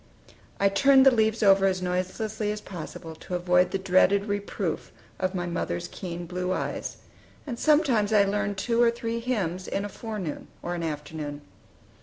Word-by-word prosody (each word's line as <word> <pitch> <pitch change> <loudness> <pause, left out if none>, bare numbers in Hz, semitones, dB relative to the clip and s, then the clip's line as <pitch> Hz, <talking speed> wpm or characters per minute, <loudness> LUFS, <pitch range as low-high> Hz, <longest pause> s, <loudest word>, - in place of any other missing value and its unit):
I 200 - +4
turned 265 +7 +5
the 270 - +8
leaves 220 -1 +2
over 195 -1 +6
as 185 -1 0
noiselessly 185 +4 -2
as 210 - -4
possible, 165 -4 -8
to 180 - -5
avoid 180 0 +3
the 195 - -1
dreaded 195 +1 +3
reproof 205 -1 -3 0.3
of 185 0 -1
my 175 -1 -1
mother's 170 - -3
keen 175 -2 -6
blue 180 +1 -3
eyes; - - -3 0.5
and 240 -5 -5
sometimes 275 -9 +3
I 210 -2 +6
learned 205 0 -1
two 230 +4 +1
or 235 - +6
three 230 0 -3
hymns 190 -7 -2
in 200 - -2
a - - -5
forenoon 205 -7 -5 0.2
or 175 - -2
an 175 - -3
afternoon. 150 -2 -5
195 Hz, 170 wpm, -27 LUFS, 180-220 Hz, 0.5 s, the